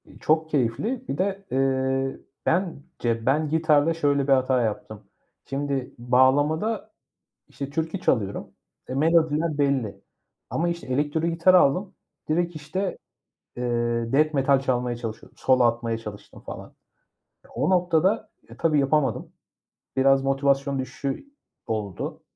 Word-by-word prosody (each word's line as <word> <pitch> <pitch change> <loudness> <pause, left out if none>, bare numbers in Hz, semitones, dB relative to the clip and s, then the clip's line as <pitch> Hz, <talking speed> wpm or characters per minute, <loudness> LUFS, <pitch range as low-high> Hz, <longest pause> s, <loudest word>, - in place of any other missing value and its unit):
İii, - - -17
çok 160 +1 +1
keyifli. 150 - -1
Bir 140 - -3
de, 195 +2 -1
ııı, 135 0 0 0.3
bence 140 -10 -1
ben 150 +3 +2
gitarda 160 0 +3
şöyle 145 -3 +1
bir 135 - +5
hata 130 -1 +2
yaptım: 110 -1 -4 0.4
Şimdi, 140 -1 -3
bağlamada, 145 - +2 0.6
işte, 140 -1 -6
türkü 160 +5 -2
çalıyorum. 100 - 0 0.4
E, - - -5
melodiler 160 +1 +2
belli 140 -7 0 0.5
ama, 170 +2 0
işte, 170 -3 -5
elektro 145 +4 0
gitar 170 +2 +3
aldım. 180 +2 +4 0.4
Direkt 170 +2 0
işte, 185 +6 -3 0.6
eee, 120 -1 -1
death 155 +2 +3
metal 135 -1 +3
çalmaya 125 -2 -1
çalışıyordum, 115 -2 -8
solo 130 -1 +3
atmaya 115 -1 +1
çalıştım 105 -3 -10
falan. - - -9 0.7
E, - - -20
o - - -1
noktada, 185 +4 +2 0.2
e, - - -13
tabii 160 -3 +2
yapamadım. 140 +1 0 0.6
Biraz 135 0 +4
motivasyon 140 0 +1
düşüşü 135 - -4 0.4
oldu. 105 -4 -4
140 Hz, 125 wpm, -25 LUFS, 130-160 Hz, 0.7 s, bir